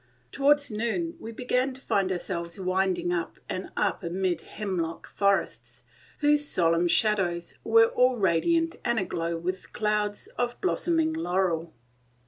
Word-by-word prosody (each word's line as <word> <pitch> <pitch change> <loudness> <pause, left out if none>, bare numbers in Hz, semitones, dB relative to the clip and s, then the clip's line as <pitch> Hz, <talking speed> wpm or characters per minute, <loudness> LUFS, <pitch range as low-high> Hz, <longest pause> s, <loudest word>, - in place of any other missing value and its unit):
Towards 285 -1 +3
noon 235 +11 -2
we 225 - -7
began 250 +3 0
to 260 - -9
find 195 -6 0
ourselves 170 -1 -3
winding 185 -1 0
up 170 -2 -3
and 185 - -4
up - - 0
amid 180 +1 -1
hemlock 175 -6 -4
forests, 120 - -1 0.4
whose 295 0 +4
solemn 170 0 +3
shadows 175 -4 +1
were 225 0 +6
all 250 0 +3
radiant 325 - +2
and 235 -1 0
aglow 170 -4 -2
with 185 +2 -5
clouds 210 -1 -1
of 245 0 -1
blossoming 325 -4 +1
laurel. 180 - -1
195 Hz, 130 wpm, -27 LUFS, 175-250 Hz, 0.4 s, were